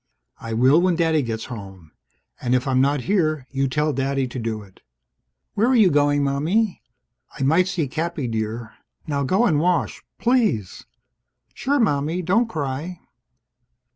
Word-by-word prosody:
"I 115 0 -6
will 130 +8 +4
when 180 -1 +2
Daddy 160 -2 +2
gets 115 -3 -4
home. 95 -9 -10 0.5
And 125 0 +1
if 125 +2 -1
I'm 130 -1 +2
not 140 0 +1
here, 155 -6 0
you 135 0 0
tell 150 +3 0
Daddy 135 0 -1
to 125 - -6
do 110 -2 -3
it." 95 -2 -20 0.7
"Where 220 +4 +2
are 260 - +3
you 215 -6 +5
going, 145 0 +2
Mommie?" 165 +10 0 0.6
"I - - -2
might 165 +7 +3
see 180 -6 -1
Cappy, 155 -1 -3
dear. 110 0 -4 0.3
Now 140 -2 -1
go 190 - +2
and 155 -10 +2
wash, 175 +1 0 0.2
please!" 215 - 0 0.7
"Sure, 285 +2 0
Mommie. 165 - 0
Don't 225 +8 +2
cry." 155 +2 -4
145 Hz, 155 wpm, -22 LUFS, 125-175 Hz, 0.7 s, you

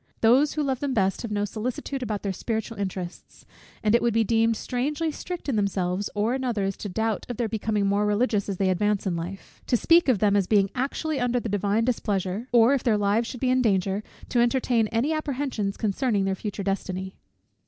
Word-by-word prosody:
Those 255 +6 +4
who 305 - -1
love 265 -3 -1
them 280 -2 -2
best 195 -2 +1
have 230 - -5
no 205 -1 0
solicitude 245 +6 -4
about 215 -4 -3
their 200 -2 -1
spiritual 225 +3 -3
interests: 185 -3 -6 0.4
and 210 0 +3
it 235 - +5
would 235 -2 +1
be 225 - +4
deemed 225 0 +2
strangely 295 +6 -2
strict 355 +3 -6
in 260 -6 0
themselves, 195 -1 -1
or 210 +4 +1
in 265 0 -2
others, 205 -6 -1
to 205 - -5
doubt 220 +3 -2
of 245 - -4
their 235 - 0
becoming 215 -1 -1
more 200 +1 +2
religious 210 -1 +1
as 195 - -2
they 190 0 +2
advance 205 +2 0
in 185 -3 0
life; 175 +4 -7
to 245 - +3
speak 335 +3 +4
of 245 - +4
them 205 +1 +2
as 195 -3 +2
being 200 -3 +3
actually 280 +3 -2
under 245 0 +1
the 230 - -4
divine 205 +2 +1
displeasure; 205 -2 -1
or, 240 +2 +6
if 275 - +1
their 225 -4 +2
lives 205 +3 +1
should 250 - -7
be 255 -1 +2
in 255 0 +3
danger, 195 -3 +1 0.3
to 245 - +1
entertain 240 -2 +2
any 235 +9 0
apprehensions 270 -9 -2
concerning 210 -1 0
their 195 - +1
future 200 +1 -5
destiny. 190 -1 -3
220 Hz, 215 wpm, -25 LUFS, 200-250 Hz, 0.4 s, or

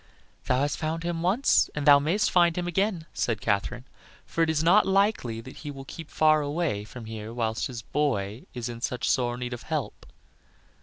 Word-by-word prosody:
"Thou 130 - +2
has 145 0 0
found 160 +1 -3
him 170 -1 -2
once 200 +11 +3
and 150 -1 -2
thou 145 -1 +8
mayst 170 +9 +1
find 175 -2 +4
him 175 - -1
again," 185 -1 0
said 115 -3 -1
Katherine, 120 +6 -1 0.4
"for 165 - -2
it 165 - +3
is 160 -1 +1
not 195 +6 +5
likely 195 - +1
that 130 +3 -12
he 150 - -7
will 135 -1 -8
keep 160 +2 -9
far 155 -1 +4
away 145 -7 -1
from 115 +2 -10
here 110 0 -7
whilst 115 -2 -1
his 120 -3 -7
boy 115 -6 -1
is 120 -1 -3
in 120 -1 -7
such 120 -1 -2
sore 120 -1 +1
need 125 0 -4
of 120 - -6
help." - - -4
145 Hz, 200 wpm, -27 LUFS, 120-165 Hz, 0.4 s, thou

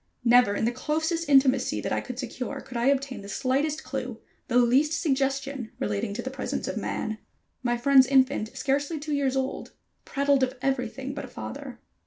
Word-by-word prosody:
Never 240 -4 +5
in 220 - 0
the 235 - +2
closest 320 +5 -1
intimacy 270 -2 +4
that - - -3
I - - 0
could 250 -2 -7
secure 255 +1 -4
could 255 - -11
I 235 +2 +1
obtain 275 -4 0
the 200 - -10
slightest 280 +6 0
clue, - - -5 0.3
the 245 - +2
least 270 +6 +4
suggestion 275 -4 -1
relating 205 +1 -2
to 240 - -4
the 260 - -4
presence 265 0 -3
of - - -3
man. 215 0 -3 0.4
My 240 -1 0
friend's 265 +1 +6
infant, 265 -3 +2
scarcely 285 +4 0
two 300 +1 -4
years 275 -2 +1
old, 265 0 -3 0.3
prattled 280 -1 +1
of 260 0 +1
everything 265 0 -2
but 285 - -5
a - - -10
father. - - -7
265 Hz, 185 wpm, -27 LUFS, 245-280 Hz, 0.4 s, friend's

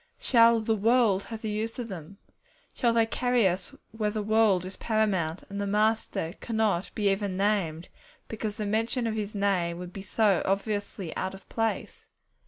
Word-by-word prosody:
Shall 230 -2 +5
'the 220 0 0
world' 220 -2 +3
have 225 -1 -8
the 220 - -2
use 220 +2 -3
of 245 -2 -4
them? 190 -1 -9 0.6
Shall 240 -3 +2
they 230 -1 +3
carry 245 -1 +2
us 185 +1 -3 0.2
where 215 -1 -1
the 210 0 -3
world 215 -4 +3
is 185 - -7
paramount, 195 -7 0
and 200 0 -5
the 200 - -1
Master 210 -5 0
cannot 220 -6 0
be 205 -2 +2
even 195 -1 -2
named, 190 -5 0 0.4
because 215 -1 -4
the 215 -2 -3
mention 225 +4 0
of 225 - 0
His 215 -1 -4
Name 185 -4 0
would 180 0 -8
be 195 - -6
so 200 -2 +2
obviously 200 -3 -2
out 190 +1 -3
of 195 - -15
place? 225 -1 -2
210 Hz, 180 wpm, -28 LUFS, 195-225 Hz, 0.6 s, Shall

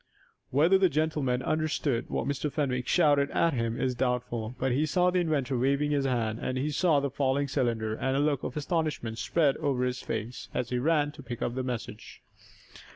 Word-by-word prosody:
Whether 165 +8 +4
the 190 -2 +4
gentleman 150 -5 0
understood 155 -5 -1
what - - -2
Mr. 140 +1 -2
Fenwick 130 -4 -1
shouted 145 -5 +3
at 165 -1 +2
him 115 -2 -1
is 130 - 0
doubtful, 125 -2 -2
but 130 0 0
he 145 +5 +1
saw 180 +3 +2
the 180 - +2
inventor 145 -6 0
waving 140 +3 +1
his 140 -2 +1
hand, 115 -4 0
and 130 - -2
he 145 +4 -1
saw 155 0 +3
the 140 -1 -2
falling 140 +1 0
cylinder, 115 -5 -1
and 130 +4 -1
a - - +2
look 145 -2 +1
of - - -5
astonishment 150 -7 -2
spread 150 -5 +2
over 140 -5 0
his 125 0 -2
face, 110 +3 -5
as 125 -1 -2
he 125 - 0
ran 145 +1 +2
to 145 - -12
pick 120 -3 -5
up 120 - -1
the 130 - -2
message. 125 -3 -6
135 Hz, 200 wpm, -28 LUFS, 125-150 Hz, -, Whether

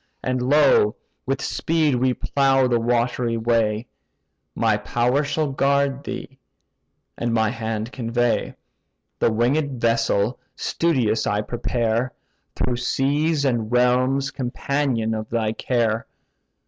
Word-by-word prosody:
And 130 -1 -1
lo, 130 -5 +4 0.3
with 135 +1 -1
speed 160 -3 +1
we 125 0 +1
plough 135 -2 +2
the 120 -2 +2
watery 120 0 0
way; 115 -1 +1 0.7
My - - +2
power 125 +4 0
shall 145 0 -1
guard 140 0 +1
thee, 135 0 -7 0.8
and 120 0 -1
my 110 -1 +2
hand 110 -1 -4
convey: 120 -1 -1 0.6
The - - +3
winged 130 +4 0
vessel 115 -1 +1 0.2
studious 130 -10 0
I 105 0 +1
prepare, 120 +1 -1 0.4
Through 125 -1 -1
seas 145 +4 0
and 120 -4 0
realms 125 +3 +2
companion 125 -2 -1
of 110 -1 -4
thy 110 -2 0
care. 115 -2 -1
125 Hz, 115 wpm, -22 LUFS, 115-135 Hz, 0.8 s, lo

